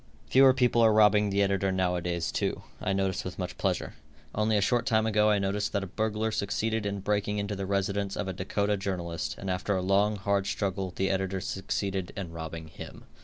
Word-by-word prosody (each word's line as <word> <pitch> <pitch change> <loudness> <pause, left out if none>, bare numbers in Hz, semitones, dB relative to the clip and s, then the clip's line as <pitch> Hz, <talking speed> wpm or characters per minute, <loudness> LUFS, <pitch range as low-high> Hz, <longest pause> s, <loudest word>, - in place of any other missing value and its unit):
Fewer 135 0 +6
people 125 -2 +3
are 110 -1 +6
robbing 105 -1 +5
the 100 0 +2
editor 95 -1 +1
now 95 -1 +1
a 90 - -2
days, 85 -1 -2
too, - - -2 0.2
I - - 0
notice 95 -1 0
with - - -6
much - - -4
pleasure. - - -1 0.4
Only 110 0 +2
a - - +3
short 120 +3 +1
time 110 -1 +3
ago 105 -1 +3
I 105 - +4
noticed 100 +1 -1
that 100 -1 0
a - - -3
burglar 110 +3 -1
succeeded 110 +1 -1
in 100 -1 -3
breaking 105 +1 0
into 100 0 -2
the 95 -1 -4
residence 100 0 -1
of - - -2
a 95 - -2
Dakota 100 +3 -1
journalist, 90 -4 -3
and 100 - -7
after 95 +2 -1
a 95 - 0
long, 100 +3 +3
hard 100 0 0
struggle 95 -2 -2
the 95 0 +1
editor 95 0 -1
succeeded 95 0 -3
in 90 -4 -5
robbing 80 -1 -7
him. - - -10
100 Hz, 215 wpm, -28 LUFS, 95-105 Hz, 0.4 s, Fewer